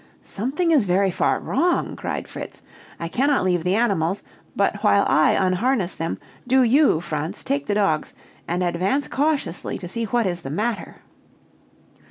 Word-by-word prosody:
"Something 280 - -1
is 285 -9 +4
very 190 +1 +2
far 180 - +1
wrong!" 345 +6 0
cried - - -4
Fritz. - - -9 0.4
"I 170 - -3
cannot 275 - +1
leave 180 -3 +1
the 180 +2 +1
animals; 200 -5 +1 0.3
but - - +1
while - - +4
I - - +4
unharness 190 +2 +1
them, 165 +1 -3 0.3
do 260 +1 +4
you, 255 - +4
Franz, 155 -1 -4
take 140 0 -2
the 205 - 0
dogs, 195 -7 0 0.3
and 175 +2 -1
advance 185 +11 0
cautiously 285 - -1
to 180 - -7
see 230 +6 -3
what 235 +1 0
is 175 -2 -2
the 135 - -7
matter." 215 +10 -2
195 Hz, 160 wpm, -22 LUFS, 175-255 Hz, 0.4 s, is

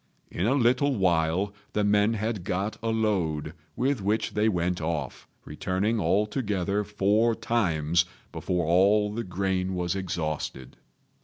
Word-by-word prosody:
In 90 - -1
a 130 - +3
little 130 +2 +3
while 90 0 +1 0.2
the 105 - +1
men 105 +2 +3
had 110 -2 -2
got 95 +2 -2
a 115 - -1
load, 90 -9 0 0.2
with 130 -2 0
which 105 +3 0
they 105 +1 +2
went 90 -2 -1
off, 75 -4 -4 0.2
returning 100 +5 -1
altogether 105 +1 0
four 105 +3 +2
times 85 -8 +1 0.3
before 90 -2 -1
all 100 +5 +3
the 115 +2 -3
grain 95 0 -1
was 90 0 -1
exhausted. 80 -8 -4
100 Hz, 135 wpm, -27 LUFS, 90-110 Hz, 0.3 s, a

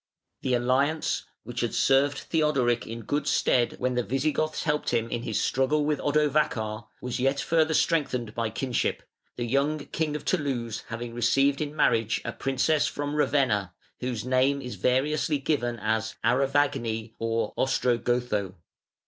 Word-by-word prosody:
The 130 -1 +1
alliance, 135 +6 +1 0.2
which - - -6
had - - -1
served 135 +1 +3
Theodoric 135 -7 +1
in 115 +1 -6
good 145 +7 -1
stead 120 -2 +2
when 125 0 -1
the 125 - +1
Visigoths 150 +5 -1
helped 150 -1 0
him 115 -1 0
in 120 - -2
his - - -2
struggle 145 +3 +1
with 150 -1 0
Odovacar, 140 -7 0
was 125 0 -3
yet 135 +2 +1
further 160 +1 +2
strengthened 130 -10 +1
by 115 -1 -1
kinship, 125 +3 -1 0.3
the 120 - -3
young 140 +5 +1
king 150 +1 -3
of 150 - -5
Toulouse 130 - -1
having 115 0 -5
received 135 +4 +2
in 150 0 -3
marriage 115 -6 +2
a - - -3
princess 135 +3 +1
from 145 0 -3
Ravenna, 120 -11 +1 0.2
whose 125 -3 -3
name 130 +2 +2
is 125 -2 -6
variously 145 +4 +1
given 130 -4 -1
as 110 +1 -1
Arevagni 125 -3 +1
or 115 0 -1
Ostrogotho. 120 -6 0
130 Hz, 150 wpm, -27 LUFS, 115-145 Hz, 0.3 s, served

